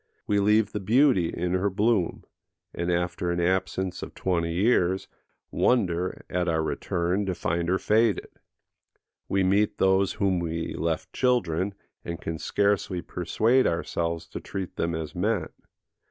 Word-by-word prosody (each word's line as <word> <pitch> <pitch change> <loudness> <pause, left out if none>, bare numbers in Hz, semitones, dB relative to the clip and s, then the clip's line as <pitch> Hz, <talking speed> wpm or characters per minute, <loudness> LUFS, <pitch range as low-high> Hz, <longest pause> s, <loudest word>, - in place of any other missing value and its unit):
We 105 -1 +2
leave 105 +1 +3
the 105 - -3
beauty 110 - +3
in 90 +1 -2
her 95 +2 +1
bloom, 100 -2 +1 0.5
and, 85 +1 -2
after 90 0 -1
an 85 0 0
absence 95 +1 0
of - - -8
twenty 85 -3 0
years, 95 -1 +2 0.4
wonder, 90 -7 +1
at 90 0 -1
our 80 -1 +1
return, 90 +5 -1
to 95 - -1
find 85 +1 -1
her 95 - +3
faded. 110 +1 +2 1.0
We 95 0 +2
meet 100 +3 +2
those 95 0 +3
whom 95 -3 +1
we 85 -1 -3
left - - -2
children, 100 -7 +1 0.3
and 85 -1 -5
can 80 -1 -4
scarcely 100 -2 0
persuade 115 +8 +2
ourselves 85 -1 -2
to - - -6
treat 95 -3 -6
them 85 0 -1
as 80 -1 -5
men. 100 +6 0
95 Hz, 145 wpm, -26 LUFS, 85-100 Hz, 1.0 s, leave